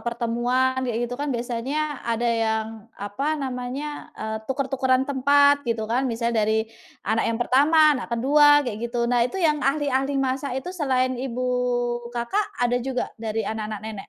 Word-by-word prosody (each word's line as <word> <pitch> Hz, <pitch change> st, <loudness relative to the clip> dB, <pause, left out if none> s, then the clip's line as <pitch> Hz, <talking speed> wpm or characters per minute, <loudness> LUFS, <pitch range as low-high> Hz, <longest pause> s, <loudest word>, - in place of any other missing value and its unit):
pertemuan 240 Hz, +2 st, 0 dB
kayak 240 Hz, -3 st, -2 dB
gitu 245 Hz, -, -6 dB
kan 290 Hz, -, -2 dB
biasanya 260 Hz, +5 st, -2 dB
ada 235 Hz, 0 st, -2 dB
yang 225 Hz, -2 st, +1 dB, 0.7 s
namanya, 265 Hz, +2 st, -5 dB
eee, 220 Hz, 0 st, -4 dB
tuker-tukeran 265 Hz, -1 st, +1 dB
tempat 285 Hz, +1 st, +4 dB
gitu 225 Hz, -1 st, -1 dB
kan. 250 Hz, +4 st, 0 dB
Misal 235 Hz, 0 st, -1 dB
dari 220 Hz, 0 st, +1 dB, 0.4 s
anak 220 Hz, +2 st, +1 dB
yang 230 Hz, -, -1 dB
pertama, 300 Hz, +5 st, +4 dB
anak -, -, -7 dB
ke-2 290 Hz, +3 st, +5 dB
kayak 215 Hz, -3 st, -4 dB
gitu. 235 Hz, 0 st, -1 dB
Nah 240 Hz, 0 st, +2 dB
itu -, -, -7 dB
yang 310 Hz, -5 st, +2 dB
ahli-ahli 275 Hz, -1 st, 0 dB
masak 265 Hz, 0 st, -1 dB
itu 355 Hz, +7 st, -5 dB
selain 260 Hz, -7 st, 0 dB
ibu 255 Hz, -1 st, -3 dB, 0.7 s
Kakak 405 Hz, -, -2 dB
ada 245 Hz, +1 st, +1 dB
juga 260 Hz, 0 st, -3 dB
dari 220 Hz, 0 st, -2 dB
anak-anak 215 Hz, -1 st, -4 dB
Nenek? 220 Hz, -, -5 dB
255 Hz, 155 wpm, -24 LUFS, 235-280 Hz, 0.7 s, ke-2